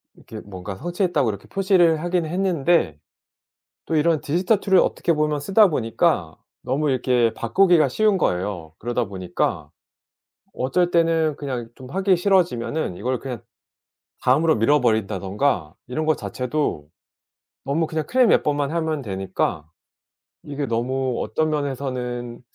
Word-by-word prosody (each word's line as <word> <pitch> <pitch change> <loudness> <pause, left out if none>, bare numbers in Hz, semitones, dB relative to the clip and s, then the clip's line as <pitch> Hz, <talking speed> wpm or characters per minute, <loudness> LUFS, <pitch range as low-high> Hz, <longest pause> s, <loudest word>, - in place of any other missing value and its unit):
이렇게 110 - -10
뭔가 95 0 -7
성취했다고 175 - 0
이렇게 100 -2 -6
표시를 185 -5 +3
하긴 175 -1 0
했는데 170 - +1 0.9
또 160 - -2
이런 155 0 +2
디지털 180 +7 +1
툴을 190 -2 +4
어떻게 170 - +1
보면 150 -1 0
쓰다 200 +6 +5
보니까 115 - 0 0.3
너무 140 +4 0
이렇게 125 -3 +2
바꾸기가 165 - +3
쉬운 210 +6 +2
거예요. 90 - -2
그러다 120 +1 -1
보니까 95 -2 -3 0.8
어쩔 170 +8 0
때는 165 -3 +2
그냥 130 -6 -5
좀 130 -1 -12
하기 190 +1 +2
싫어지면은 165 - 0
이걸 125 +2 -2
그냥 125 -4 -6 0.8
다음으로 155 +6 +3
미 115 +1 +1
버린다든가 110 - +1
이런 155 +5 -2
거 155 - +4
자체도 125 - -3 0.8
너무 150 +4 0
그냥 155 -1 -3
클릭 255 -2 +4
몇 - - +4
번만 145 -1 0
하면 160 -3 -1
되니까 95 -6 -3 0.7
이게 145 -1 -4
너무 125 +2 -1
어떤 155 0 -1
면에서는 125 -4 -3
140 Hz, 310 characters per minute, -22 LUFS, 115-165 Hz, 0.9 s, 쓰다